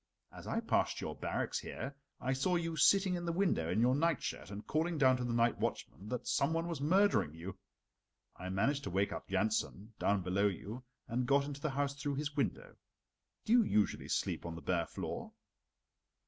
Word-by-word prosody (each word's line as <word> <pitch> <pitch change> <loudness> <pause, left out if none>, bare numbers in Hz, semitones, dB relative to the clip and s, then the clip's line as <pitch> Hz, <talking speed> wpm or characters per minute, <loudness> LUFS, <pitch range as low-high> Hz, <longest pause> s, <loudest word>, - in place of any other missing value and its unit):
As - - -10
I - - 0
passed - - +1
your - - -4
barracks - - -2
here, 140 +1 -6 0.2
I 130 +1 0
saw 140 +8 +1
you 165 -1 -1
sitting 195 +3 +5
in 175 -1 -2
the 170 - -1
window 170 - +1
in - - +1
your 125 +2 +4
nightshirt 150 - 0
and 105 +1 -7
calling 165 +2 0
down 130 -3 +5
to 125 - -3
the 120 - -1
night 115 0 +2
watchman 100 +5 -3
that 125 -2 -3
some 140 +4 +2
one 165 +1 0
was 165 -5 -4
murdering 185 - +3
you. 95 +4 -7 0.8
I 90 - -6
managed 135 +10 +1
to - - -2
wake 95 +3 +1
up - - -7
Jansen 105 +2 -1
down 100 -2 +2
below 95 +3 +2
you, 105 +6 -5 0.2
and 125 +1 -1
got 140 0 +4
into 145 -1 -6
the 155 - 0
house 140 +1 0
through 140 0 -3
his 145 +1 -3
window. - - -2 0.7
Do 225 - +3
you 245 - +8
usually 105 - +1
sleep - - -1
on 85 -1 -5
the 80 - -8
bare 85 -2 0
floor?" - - -5
135 Hz, 200 wpm, -34 LUFS, 100-160 Hz, 0.8 s, you